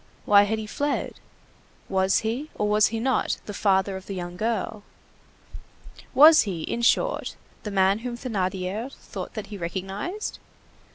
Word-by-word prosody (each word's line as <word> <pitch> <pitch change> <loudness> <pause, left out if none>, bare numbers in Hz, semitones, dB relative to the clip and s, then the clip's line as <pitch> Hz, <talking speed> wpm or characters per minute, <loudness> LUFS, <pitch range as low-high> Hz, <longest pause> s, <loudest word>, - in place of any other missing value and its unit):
Why 205 0 +6
had 220 +2 -1
he 220 - -5
fled? 285 +6 -2 0.7
Was 190 0 +2
he, 240 +8 -3
or 210 - 0
was 210 0 +4
he 225 0 -3
not, 260 +2 0
the 205 - -6
father 195 -1 +1
of 190 0 -9
the 195 - -5
young 175 -1 -5
girl? 215 +1 -2 1.3
Was 310 +3 +9
he, 180 -6 -3
in 235 - -3
short, 235 - +1 0.3
the 210 - -5
man 195 +1 +3
whom 240 0 -5
Thénardier 200 0 -3
thought - - -8
that 215 - -4
he 200 - -6
recognized? 195 - -4
210 Hz, 155 wpm, -25 LUFS, 190-235 Hz, 1.3 s, Was